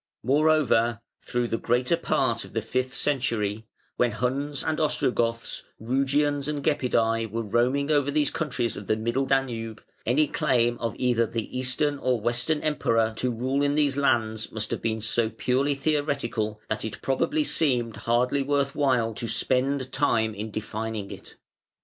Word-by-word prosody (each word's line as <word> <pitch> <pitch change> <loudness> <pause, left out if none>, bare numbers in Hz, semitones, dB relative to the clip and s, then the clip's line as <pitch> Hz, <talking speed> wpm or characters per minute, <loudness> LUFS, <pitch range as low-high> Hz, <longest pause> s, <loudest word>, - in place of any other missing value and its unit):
Moreover, 135 -4 +3 0.2
through 120 -1 -2
the 115 - -1
greater 125 +7 +2
part 120 -8 0
of - - -13
the 115 - 0
fifth 130 +2 -2
century, 115 -6 -1 0.3
when 120 -3 +2
Huns 135 +5 -1
and 155 -1 -1
Ostrogoths, 120 -6 0 0.2
Rugians 140 +4 +1
and 150 -2 -3
Gepidæ 115 -6 +1
were 115 +2 -3
roaming 125 +7 +1
over 145 -2 +3
these 145 0 +1
countries 125 -7 -2
of 100 - -8
the 110 - +2
Middle 120 +5 -1
Danube, 115 -5 -1 0.2
any 135 +7 +3
claim 120 -7 +1
of 115 -2 -2
either 120 -2 +2
the 115 +2 -5
Eastern 135 +3 0
or 125 -3 +1
Western 120 +7 0
Emperor 115 -7 +1
to 125 - 0
rule 130 +4 -1
in 145 0 +2
these 145 -2 +2
lands 115 -6 +1
must 110 0 -4
have - - -2
been 110 -1 -1
so 110 +1 +1
purely 130 +5 0
theoretical 135 -8 -1
that 110 0 -2
it 110 - -6
probably 295 - +1
seemed 125 - +1
hardly 125 +4 +1
worth 140 0 0
while 125 -6 +1
to 115 - -4
spend 130 +2 0
time 115 -6 +1
in 105 +2 -5
defining 110 -1 -4
it. - - -10
125 Hz, 160 wpm, -26 LUFS, 115-140 Hz, 0.3 s, Moreover